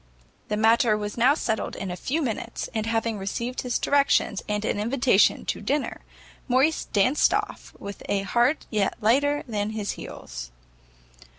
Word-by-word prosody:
The 210 Hz, -, -1 dB
matter 225 Hz, 0 st, +4 dB
was 205 Hz, 0 st, -4 dB
now 255 Hz, +5 st, +4 dB
settled 220 Hz, -8 st, -2 dB
in 195 Hz, -2 st, -4 dB
a -, -, -3 dB
few 295 Hz, -, -2 dB
minutes, 235 Hz, -1 st, -4 dB
and 220 Hz, -1 st, -2 dB
having 225 Hz, -1 st, -1 dB
received 235 Hz, +6 st, -3 dB
his 250 Hz, -1 st, -1 dB
directions, 280 Hz, -7 st, +2 dB
and 210 Hz, 0 st, -1 dB
an 205 Hz, -, -1 dB
invitation 240 Hz, -1 st, +3 dB
to -, -, -2 dB
dinner, 290 Hz, 0 st, -2 dB, 0.5 s
Morrice 270 Hz, +5 st, +2 dB
danced 255 Hz, +8 st, +3 dB
off, -, -, -4 dB
with 200 Hz, 0 st, -8 dB
a 195 Hz, -1 st, +1 dB
heart 240 Hz, +9 st, +1 dB
yet 210 Hz, -3 st, +1 dB
lighter 285 Hz, +7 st, +2 dB
than 210 Hz, -2 st, -2 dB
his 215 Hz, -2 st, -3 dB
heels. 60 Hz, 0 st, -8 dB
225 Hz, 160 wpm, -25 LUFS, 205-255 Hz, 0.5 s, matter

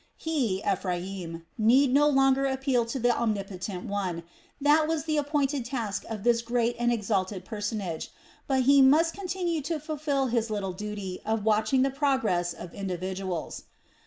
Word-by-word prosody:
He, 250 Hz, -12 st, -1 dB
Ephraim, 180 Hz, -3 st, -3 dB
need 250 Hz, +5 st, +4 dB
no 295 Hz, +2 st, +5 dB
longer 270 Hz, -1 st, +3 dB
appeal 265 Hz, -3 st, 0 dB
to 235 Hz, -, -3 dB
the 245 Hz, -1 st, +2 dB
Omnipotent 195 Hz, -4 st, -3 dB
One 185 Hz, -4 st, -3 dB, 0.4 s
that 300 Hz, +2 st, +4 dB
was 320 Hz, -2 st, -1 dB
the 310 Hz, -1 st, -1 dB
appointed 290 Hz, -2 st, 0 dB
task 235 Hz, -5 st, -3 dB
of 215 Hz, -3 st, -5 dB
this 235 Hz, -1 st, +3 dB
great 235 Hz, 0 st, 0 dB
and 240 Hz, 0 st, +2 dB
exalted 195 Hz, -4 st, -1 dB
personage; 205 Hz, -6 st, -4 dB, 0.4 s
but 265 Hz, -2 st, +2 dB
he 280 Hz, +2 st, +6 dB
must 310 Hz, +5 st, +5 dB
continue 360 Hz, -4 st, -2 dB
to 310 Hz, +3 st, -2 dB
fulfil 295 Hz, -2 st, -1 dB
his 235 Hz, -2 st, 0 dB
little 200 Hz, -3 st, -2 dB
duty 200 Hz, -1 st, -5 dB
of 220 Hz, -1 st, -1 dB
watching 220 Hz, +4 st, +3 dB
the 270 Hz, -, +1 dB
progress 260 Hz, -, +1 dB
of 170 Hz, 0 st, -9 dB
individuals. 185 Hz, -2 st, -4 dB
235 Hz, 155 wpm, -27 LUFS, 195-275 Hz, 0.4 s, he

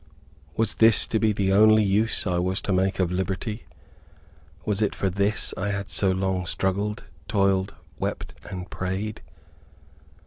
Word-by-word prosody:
Was 110 Hz, -2 st, +1 dB
this 115 Hz, -1 st, +5 dB
to 110 Hz, -, -1 dB
be 110 Hz, -1 st, +3 dB
the 95 Hz, -2 st, 0 dB
only 110 Hz, +1 st, +6 dB
use 105 Hz, +4 st, +1 dB
I 90 Hz, -3 st, 0 dB
was 95 Hz, +2 st, 0 dB
to 100 Hz, -, -1 dB
make 95 Hz, +1 st, +1 dB
of 90 Hz, -2 st, 0 dB
liberty? 95 Hz, +4 st, -3 dB, 1.0 s
Was 105 Hz, 0 st, 0 dB
it 105 Hz, -, +1 dB
for 95 Hz, -, -1 dB
this 100 Hz, +3 st, 0 dB
I 100 Hz, +2 st, -2 dB
had 100 Hz, -2 st, -3 dB
so 95 Hz, -, +2 dB
long 95 Hz, -1 st, -1 dB
struggled, 100 Hz, +4 st, -1 dB, 0.2 s
toiled, 95 Hz, -1 st, +1 dB, 0.2 s
wept -, -, -4 dB, 0.2 s
and 90 Hz, -2 st, -6 dB
prayed? 95 Hz, +4 st, -4 dB
100 Hz, 150 wpm, -25 LUFS, 95-105 Hz, 1.0 s, only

